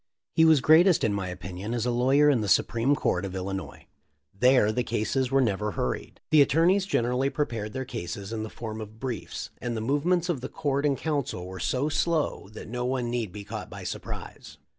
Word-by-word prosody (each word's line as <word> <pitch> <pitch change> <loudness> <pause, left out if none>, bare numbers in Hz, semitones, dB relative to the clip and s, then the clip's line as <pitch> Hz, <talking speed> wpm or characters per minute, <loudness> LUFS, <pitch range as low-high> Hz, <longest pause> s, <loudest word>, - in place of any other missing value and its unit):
He 160 -1 +5
was 160 -4 +6
greatest 165 +5 +5
in 110 - +2
my 100 -2 -2
opinion 90 +5 -5
as 120 -1 -1
a 125 - +1
lawyer 135 +5 +4
in 135 -6 +4
the 105 - -2
Supreme 115 +9 +3
Court 90 -8 0
of 95 -1 -5
Illinois. 95 +1 -5 0.5
There 125 0 +4
the 125 - 0
cases 120 +3 -1
were 135 +1 +3
never 105 -3 0
hurried. 65 - -3
The 155 -2 +7
attorneys 175 +7 +3
gen 120 - +1
erally 125 +3 0
prepared 115 -9 -3
their 130 0 -3
cases 100 -2 -6
in 110 - -3
the 110 - -5
form 110 -1 -6
of 110 +1 -10
briefs, 125 -5 -5
and 120 -2 -3
the - - -1
movements 155 +9 +1
of 165 -8 -1
the 130 - -5
court 145 -2 0
and 140 -2 +1
counsel 145 - -2
were 95 +1 -8
so 130 +3 0
slow 155 - 0
that - - -9
no 125 +3 -3
one 125 -1 -1
need 115 -5 -2
be 105 +1 -8
caught - - -7
by - - -8
surprise. - - -7
120 Hz, 210 wpm, -27 LUFS, 105-140 Hz, 0.5 s, The